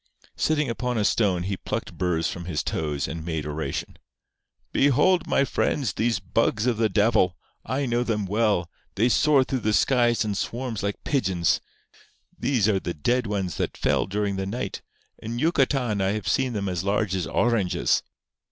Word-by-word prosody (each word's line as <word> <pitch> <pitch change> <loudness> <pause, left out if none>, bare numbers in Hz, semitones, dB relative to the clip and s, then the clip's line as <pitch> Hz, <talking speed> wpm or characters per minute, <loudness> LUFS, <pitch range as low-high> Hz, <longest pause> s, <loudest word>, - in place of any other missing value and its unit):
Sitting 150 -2 +1
upon 125 0 -2
a 105 - +1
stone, 95 -5 +2
he 95 +1 -2
plucked - - -5
burrs 85 -2 0
from 85 - -5
his 85 -4 -2
toes, 75 -3 -2
and 80 -1 -5
made 80 -2 -3
oration: 75 -2 -4 0.7
"Behold, 150 +6 +3
my 140 - +3
friends, 130 -5 0
these 115 -1 0
bugs 105 +3 0
of 125 -3 +1
the 110 -1 +2
devil! 100 -5 +2 0.3
I 130 +4 -1
know 120 -1 +1
them 110 -4 -1
well. 105 -3 +1 0.3
They 115 +5 +3
soar 145 +1 +4
through 130 0 -2
the 110 -2 0
skies 120 -2 +3
in 105 - -1
swarms 115 +2 -3
like 100 0 -3
pigeons. 95 - +1 0.7
These 125 -7 +1
are 100 -3 +2
the 85 - -4
dead 120 +10 0
ones 95 -5 -2
that - - -2
fell - - +1
during 100 0 -1
the 95 0 -2
night. 100 -2 -4 0.4
In 115 +2 -5
Yucatan 130 - +1
I 95 +1 +1
have 105 -2 -4
seen 130 -2 +1
them 100 -2 -2
as 90 -2 -2
large 100 0 0
as 90 - -2
oranges. 115 -7 +1
105 Hz, 175 wpm, -25 LUFS, 95-125 Hz, 0.7 s, soar